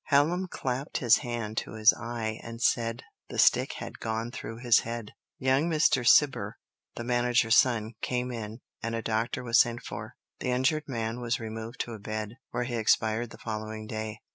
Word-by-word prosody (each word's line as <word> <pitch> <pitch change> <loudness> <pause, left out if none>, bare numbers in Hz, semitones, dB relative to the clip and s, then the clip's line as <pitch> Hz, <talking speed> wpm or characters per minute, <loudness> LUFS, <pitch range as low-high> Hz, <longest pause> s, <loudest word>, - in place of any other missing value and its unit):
Hallam 165 +6 +3
clapped 130 -4 -3
his 120 -2 +5
hand 115 -3 -4
to - - -2
his 110 -1 +6
eye 115 -2 -4
and 115 0 -8
said 115 0 +1 0.3
the - - -6
stick - - +4
had - - -8
gone 115 +1 -3
through 115 -2 -7
his 120 -1 +5
head. 115 -2 -5 0.3
Young 135 +5 +2
Mr. 155 -4 +3
Cibber, 125 -9 +4 0.4
the 120 - -5
manager's 120 -1 +3
son, 115 -3 +3
came 125 0 -1
in, 115 0 -6 0.2
and 115 0 -2
a 115 - -3
doctor 115 +2 -1
was 120 0 +4
sent 120 -1 +2
for; - - -7 0.2
the - - -2
injured 130 +5 +1
man 115 -2 -3
was 120 0 -1
removed 110 +1 -6
to 120 - -4
a 110 - -8
bed, 110 +2 -5
where - - -2
he 120 -1 -3
expired 110 +1 +2
the - - -12
following 110 -1 -5
day. 110 0 -4
115 Hz, 185 wpm, -28 LUFS, 110-125 Hz, 0.4 s, his